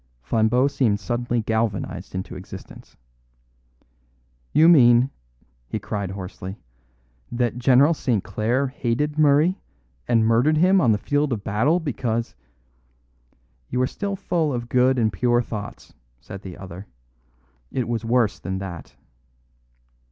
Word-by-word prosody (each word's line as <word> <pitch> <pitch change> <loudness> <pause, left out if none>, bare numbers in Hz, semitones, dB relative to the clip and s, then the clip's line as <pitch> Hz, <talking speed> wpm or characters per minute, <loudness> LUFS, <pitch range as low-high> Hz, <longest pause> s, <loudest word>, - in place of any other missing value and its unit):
Flambeau 120 +4 +2
seemed 120 -7 +1
suddenly 120 +4 -1
galvanised 110 -4 -2
into 95 0 -5
existence. 90 0 -11 1.5
"You 155 +3 +5
mean," 125 -5 +6 0.6
he - - -3
cried 100 -1 -4
hoarsely, 95 0 -7 0.7
"that 120 0 -1
General 135 +5 +5
St. 120 - -1
Clare 120 +6 0
hated 140 +4 -2
Murray, 155 +5 +3 0.5
and 115 -2 +3
murdered 120 +8 +3
him 185 +3 +4
on 120 - +4
the 105 - +2
field 145 +5 0
of 110 -4 -3
battle 125 - +1
because 115 - -2 0.7
" - - -40
"You 125 - -2
are 130 - +3
still 200 +8 -4
full 175 -5 -1
of 120 -2 -4
good 125 +2 +3
and 110 -3 +1
pure 120 +5 +2
thoughts," 105 -2 -8 0.3
said 95 +9 -10
the 95 -3 -9
other. 95 +1 -10 0.8
"It 125 -3 -2
was 115 -1 -2
worse 115 -2 +1
than 95 0 -4
that." 95 -4 -8
120 Hz, 130 wpm, -23 LUFS, 100-135 Hz, 1.5 s, mean